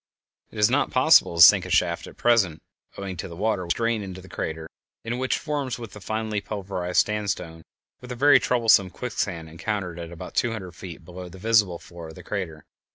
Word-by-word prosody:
It - - -13
is 105 +2 +4
not 145 +3 +2
possible 130 - +5
to 85 - +8
sink 95 +1 +8
a 95 - -7
shaft 85 -1 +1
at - - -13
present, 100 -10 +2 0.4
owing 95 -1 -5
to 90 - -5
the 85 - -10
water 100 -1 -1
which 85 - +1
has - - -11
drained 115 -2 0
into 95 -1 -8
the 95 - -13
crater, 80 -2 -5 0.4
and 120 +2 -3
which 130 0 0
forms, 145 -6 -3
with 115 -5 -9
the 105 - -11
finely 110 0 -2
pulverized 95 -4 -1
sandstone, 100 -6 -3 0.4
a 125 0 -7
very 145 +4 +6
troublesome 115 -6 +3
quicksand 95 -7 -4
encountered 90 +1 -4
at 85 0 -7
about 85 - -9
two 120 -2 +1
hundred 95 -5 -7
feet 85 -2 -10
below 90 +1 -9
the 95 - -12
visible 105 -3 +2
floor 85 -1 -11
of 80 - -11
the - - -11
crater. 85 -7 -5
100 Hz, 210 wpm, -25 LUFS, 85-115 Hz, 0.4 s, to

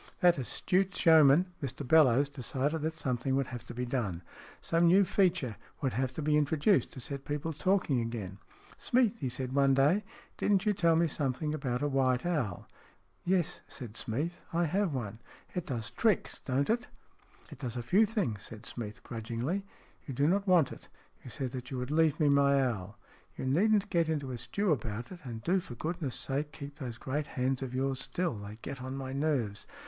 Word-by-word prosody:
That 175 -4 +5
astute 185 +8 0
showman, 160 +1 +6
Mr 135 0 -4
Bellowes, 140 -2 +5
decided 140 +3 -2
that 160 +1 -2
something 130 -2 -1
would 135 0 +1
have 120 -2 -7
to 120 - -8
be 125 +1 -2
done. 105 -9 -2 0.4
Some 170 +1 +2
new 190 +3 +6
feature 175 - +1 0.2
would 135 -4 -1
have 130 0 0
to 155 - -3
be 150 0 +3
introduced, 150 +6 +2
to 130 - -8
set 140 +2 -5
people 150 +3 -3
talking 155 -5 +1
again. 105 -5 -5 0.2
" - - -23
Smeath," 240 -2 +2
he 130 - -2
said 130 +1 -4
one 135 -1 +4
day, 150 +10 +4 0.2
" - - -26
didn't 200 -1 +2
you 210 - +3
tell 170 -4 +3
me 170 +1 +4
something 145 0 -1
once 150 - -1
about 125 -4 -2
a - - +2
white 130 -2 +1
owl? 140 - -1 0.2
" - - -30
" - - -39
Yes," 180 -1 +1
said 120 -6 -7
Smeath, 145 +11 -3
" - - -25
I 170 +1 +2
have 190 +3 +1
one." 110 -5 -4 0.2
" - - -27
It 180 - -3
does 115 -5 -3
tricks, 220 -5 +1
don't 140 +7 +1
it? 240 +2 0 0.2
" - - -34
" - - -26
It - - -10
does 125 -3 -4
a 120 - -3
few 200 - +4
things," 140 - -1
said 110 +1 -9
Smeath, 110 -3 -6
grudgingly. 120 - -3 0.2
" - - -32
You 135 - -5
do 140 +3 +3
not 195 +4 +1
want 175 -7 +5
it. - - -11 0.3
You - - -9
said 125 +2 -4
that 125 -1 -6
you 130 - -4
would 125 +2 -3
leave 155 -1 +3
me 150 - +4
my 140 0 +4
owl." 100 -3 -5 0.2
" - - -32
You - - -4
needn't 200 +9 +3
get 170 -3 +2
into 145 -4 -2
a 120 - -5
stew 195 - -1
about 115 -4 -2
it, 180 - -8
and 115 -4 -7
do 185 +6 +2
for 125 -8 -8
goodness' 155 -1 -3
sake 145 +2 -2
keep 140 0 -9
those 120 -4 -5
great 145 +4 -3
hands 130 -1 -1
of 130 -1 -4
yours 135 0 0
still. 170 +3 -1
They 105 +1 -8
get 135 - -6
on 130 +1 -5
my 130 -1 -5
nerves. 135 -8 -1
140 Hz, 220 wpm, -31 LUFS, 125-170 Hz, 0.4 s, showman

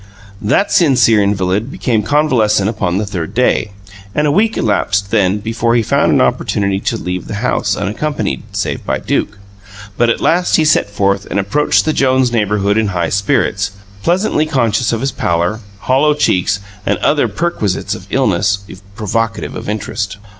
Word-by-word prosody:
That 195 - +1
sincere 125 - +4
invalid 100 +3 0
became 115 -7 0
convalescent 110 -5 +2
upon 100 -5 -1
the 105 - -1
third 95 -1 -5
day; 125 -3 +2 0.5
and 150 - +2
a 145 - +2
week 220 +7 +2
elapsed, 100 -2 0
then, 100 -3 +2
before 115 +2 -1
he 115 - +2
found - - +2
an - - +3
opportunity 100 -1 0
to 115 - -2
leave 90 -3 -4
the - - -5
house 105 -5 0
unaccompanied 105 - -2
save - - -3
by - - -1
Duke. 105 - -2 0.6
But 120 0 +3
at 115 - +1
last 180 +2 +2
he 160 - +3
set 150 - +3
forth 100 -1 0
and 100 - -1
approached 105 +10 +1
the 155 - +1
Jones 130 -3 +2
neighbourhood 105 -2 +1
in 110 - +1
high 90 -4 -1
spirits, 100 0 0 0.3
pleasantly 170 - +1
conscious 120 -6 +1
of 115 -1 -2
his 135 0 -1
pallor, 85 +5 -1 0.2
hollow 145 +3 +2
cheeks, 100 -8 +1 0.2
and - - 0
other 145 0 +2
perquisites 110 - -2
of - - -9
illness 100 0 +1 0.4
provocative 115 +1 -2
of - - -6
interest. 100 -1 -3
105 Hz, 165 wpm, -15 LUFS, 100-130 Hz, 0.6 s, sincere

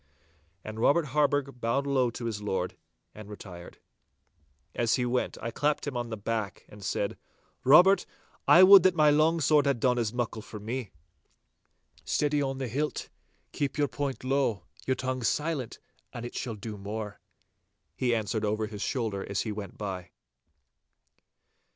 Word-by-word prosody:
And 110 0 -7
Robert 150 +7 +3
Harburgh 145 -3 +1
bowed 115 +5 0
low 130 -3 +2
to 115 +1 -7
his 110 -3 -3
lord 95 -3 -2 0.4
and 110 -1 -11
retired. 90 -4 -10 1.0
As 120 -1 +2
he 125 - 0
went 125 +1 -1
I 115 - -2
clapped 145 +5 0
him 145 -3 -4
on 120 -1 -3
the 110 - -4
back, 105 -1 -3
and 105 -1 -13
said, 100 +1 -2 0.4
'Robert, 180 +9 +6 0.4
I 180 - +8
would 195 0 +10
that 185 +1 +3
my 155 -2 +5
long 155 +3 +3
sword 150 0 +4
had 140 -4 +1
done 125 0 +2
as 115 -3 0
muckle 120 -2 -3
for 105 0 -9
me.' 115 +1 -4 1.1
'Steady 145 - +1
on 135 -1 -2
the 130 -1 -3
hilt! 145 +6 -2 0.4
Keep 145 0 -2
your 145 -1 +2
point 135 +2 -4
low, 130 -8 0 0.2
your 130 - +2
tongue 130 0 -3
silent, 145 +2 -1 0.3
and 120 - -6
it 120 - -7
shall 120 -3 -4
do 105 0 -7
more!' 105 +1 -5 0.8
he 125 -2 +1
answered 110 0 -2
over 110 +1 0
his 105 -2 -8
shoulder 110 -7 -2
as 100 -1 0
he 110 - -3
went 105 -1 -7
by. 95 -4 -5
120 Hz, 165 wpm, -28 LUFS, 105-140 Hz, 1.1 s, would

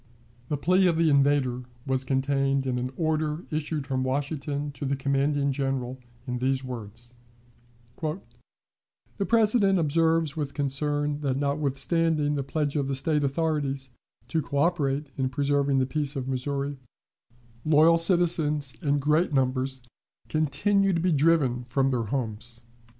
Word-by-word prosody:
The 145 - -1
plea 185 +5 +3
of 170 -2 +1
the 165 -2 +3
invader 140 -3 +2 0.2
was 130 0 0
contained 135 0 0
in 125 -1 -1
an 125 +1 -2
order 155 0 -1
issued 155 -1 -2
from 130 -1 -1
Washington 145 +2 -2
to 145 - -9
the 140 0 0
commanding 140 +1 0
General 130 -2 -2 0.3
in 125 -1 -3
these 130 +1 0
words: 120 -1 -8 0.9
"The 155 +3 -2 1.1
President 215 -3 +3
observes 160 -1 +1
with 145 -3 -4
concern 145 +1 -1
that, 135 -3 -1
notwithstanding 145 +2 +1
the 145 - -1
pledge 145 +1 -2
of 140 -2 0
the 135 - -1
State 150 +2 +1
authorities 140 -2 -1 0.4
to 160 - 0
coöperate 145 -1 0
in 130 -1 +1
preserving 140 +1 +1
the 130 - +2
peace 145 +1 -2
of 130 -2 -3
Missouri, 140 +1 -2 0.8
loyal 160 +2 +5
citizens 160 -5 +3
in 145 -3 +1
great 150 +5 +2
numbers 130 -1 0 0.5
continue 190 +7 +1
to 170 - +1
be 180 +2 +1
driven 140 -5 +2
from 135 +1 +1
their 120 -3 -1
homes. 120 0 -4
140 Hz, 140 wpm, -26 LUFS, 135-155 Hz, 1.1 s, loyal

